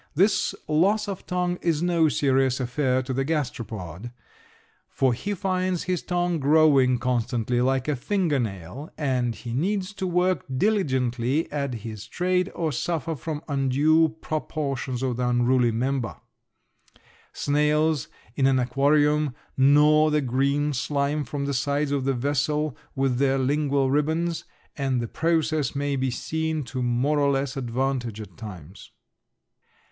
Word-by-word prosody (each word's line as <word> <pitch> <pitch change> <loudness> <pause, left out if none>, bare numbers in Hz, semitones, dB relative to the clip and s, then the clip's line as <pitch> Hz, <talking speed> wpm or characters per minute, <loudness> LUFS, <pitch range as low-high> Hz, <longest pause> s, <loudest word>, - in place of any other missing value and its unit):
This 190 +6 +2
loss 200 +8 +2
of 195 -2 -6
tongue 180 0 -1
is 165 -2 0
no 170 -3 +3
serious 135 -2 +2
affair 130 0 0
to 130 +1 -4
the 135 +1 0
gasteropod, 115 - -4 0.8
for 130 -2 +1
he 205 - -3
finds 185 -1 -1
his 180 -1 -1
tongue 175 -2 -1
growing 140 -3 +4
constantly 120 0 0
like 130 +1 +1
a 150 - +1
finger 165 - 0
nail 105 - -5
and 125 -5 0
he 120 -2 -7
needs 190 - -1
to 190 -2 -3
work 180 +1 +1
diligently 130 - 0
at 140 -4 -2
his 110 -1 -7
trade 180 +5 0
or 165 -2 -1
suffer 165 +3 -2
from 150 +2 -5
undue 145 +3 +3
proportions 140 -5 -3
of 125 -3 -1
the 125 -1 0
unruly 120 0 +3
member. 125 +1 -1 1.2
Snails 150 0 +1 0.3
in 135 - +3
an 135 -1 +3
aquarium 145 +2 +2 0.2
gnaw 150 +3 +5
the 150 0 +2
green 140 +3 +1
slime 140 +3 -1
from 140 +2 -4
the 140 - -1
sides 140 +2 0
of 140 -2 0
the 135 - +2
vessel 145 +3 0 0.2
with 135 -2 0
their 135 -1 +2
lingual 140 0 +1
ribbons, 160 +4 0 0.3
and 135 -3 0
the 120 - -2
process 155 -1 0
may 140 0 -1
be 130 0 0
seen 160 +4 -2
to 125 +1 -5
more 125 +5 +1
or 140 -1 +3
less 135 0 -1
advantage 125 -3 -2
at 100 -5 -9
times. 95 -3 -10
140 Hz, 140 wpm, -25 LUFS, 125-155 Hz, 1.2 s, gnaw